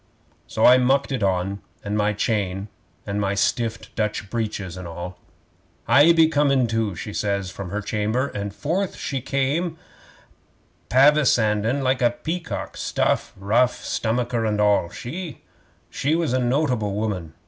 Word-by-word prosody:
'So - - +1
I 125 +1 +8
mucked 135 +3 +2
it 130 - -1
on, 95 +1 0 0.2
and 105 0 -2
my 105 0 +2
chain, 100 -2 -1 0.4
and 100 +1 -2
my 100 0 0
stiffed 115 +2 -1
Dutch 105 -2 -2
breeches 105 -6 -3
and 90 -1 -7
all. 90 +2 -7 0.7
'"I 145 +7 +7
be 165 -1 +5
comin', 140 -4 +3
too," 110 -4 -1
she 105 - -6
says 100 -3 -1
from 95 -1 -7
her 105 +3 -3
chamber, 110 +6 -1
and 100 0 -4
forth 170 - -2
she 135 -2 -3
come 145 +7 -1 1.1
pavisandin' 130 -3 +3
like 130 0 +1
a 120 - +5
peacock 160 +8 -5
stuff, - - 0
ruff, 115 +6 +1
stomacher 120 +1 -1
and 105 -1 0
all. 105 -4 +3
She 160 - -7 0.7
was 165 -6 0
a 130 - +2
notable 125 -5 0
woman. 95 -7 -3
115 Hz, 145 wpm, -23 LUFS, 100-135 Hz, 1.1 s, I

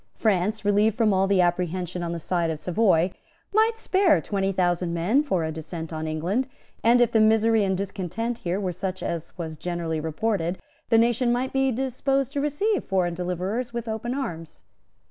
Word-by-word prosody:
France, 210 0 0
relieved 205 +1 +3
from 220 -3 +3
all 195 +1 +2
apprehension 180 -1 +1
on 170 -1 -3
the 170 - -3
side 170 0 -1
of 160 - -2
Savoy, 180 0 +2 0.4
might 445 +2 +3
spare 380 -6 +3
twenty 195 -1 -1
thousand 175 -2 0
men 200 +12 +2
for 190 - 0
a 160 - -2
descent 160 +1 -6
on 155 0 -3
England; 175 +12 -1 0.4
and, 235 +2 +5
if 240 -1 +3
the 225 - +4
misery 220 0 +4
and 190 -1 0
discontent 200 +4 -3
here 180 +2 -2
were 185 -3 -2
such 185 +1 -4
as 170 -1 -4
was 160 -3 -5
generally 170 -2 -3
reported, 170 +3 -1 0.3
the 230 - +5
nation 240 +1 +3
might 250 +2 -1
be 270 0 +2
disposed 270 +2 -1
to 285 - -1
receive 370 +9 0
foreign 180 -3 0
deliverers 180 +8 -3
with 235 -1 -4
open 225 +3 -3
arms. 165 - -6
195 Hz, 180 wpm, -25 LUFS, 175-235 Hz, 0.4 s, and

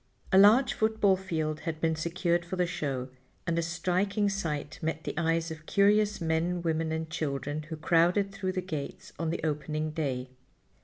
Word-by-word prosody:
A 190 - +5
large 225 +6 +6
football 220 -4 +3
field 160 -5 -2
had 160 -2 -4
been 160 0 +1
secured 170 +2 0
for 175 +2 -5
the 180 -1 +2
show, 140 -7 -3 0.4
and 170 -1 0
a - - +2
striking 185 +5 0
sight 160 -7 -3
met 160 0 -2
the - - -3
eyes 165 0 0
of 155 0 -9
curious 210 +1 +3
men, 170 +1 0
women 160 -1 0
and 160 0 -2
children, 145 -1 -3
who 160 - -4
crowded 175 +5 +3
through 190 -1 -3
the 185 - -1
gates 155 -6 -6
on 165 -1 -1
the 165 - -2
opening 155 0 -1
day. 130 -5 -3
165 Hz, 175 wpm, -29 LUFS, 155-185 Hz, 0.4 s, large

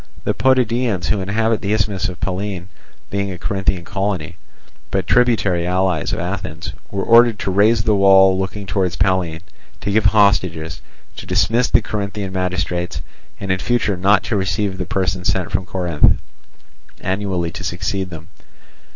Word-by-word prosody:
The - - 0
Potidæans, 120 -7 +1
who 105 - +1
inhabit 110 +3 0
the 105 0 -1
isthmus 100 -2 -1
of 90 - -9
Pallene, 95 0 -4 0.4
being 100 0 -1
a 90 - -6
Corinthian 95 -2 -1
colony, 95 -5 -3 0.5
but 95 -2 -1
tributary 105 -6 +2
allies 90 -3 0
of - - -2
Athens, 90 -3 -4 0.2
were 100 -1 -3
ordered 115 -1 +5
to 95 - -2
raze 105 +3 +3
the 110 -2 +2
wall 95 -1 +6
looking 95 +2 -3
towards 95 -3 -1
Pallene, 90 -3 0 0.4
to 100 +1 -3
give 105 0 +2
hostages, 95 -6 +2 0.4
to - - -8
dismiss 120 +3 +2
the 120 -2 +3
Corinthian 100 -2 -4
magistrates, 90 -1 -2 0.4
and 95 -1 -3
in 95 - 0
future 120 -1 0
not 95 +2 +3
to 115 - -2
receive 95 0 -1
the 90 - -2
persons 95 -1 -1
sent 90 -3 -3
from 95 -1 -1
Corinth 90 -5 +2 0.8
annually 95 -3 -2
to 95 - -8
succeed 95 +2 -2
them. 80 -2 -10
95 Hz, 155 wpm, -19 LUFS, 90-105 Hz, 0.8 s, wall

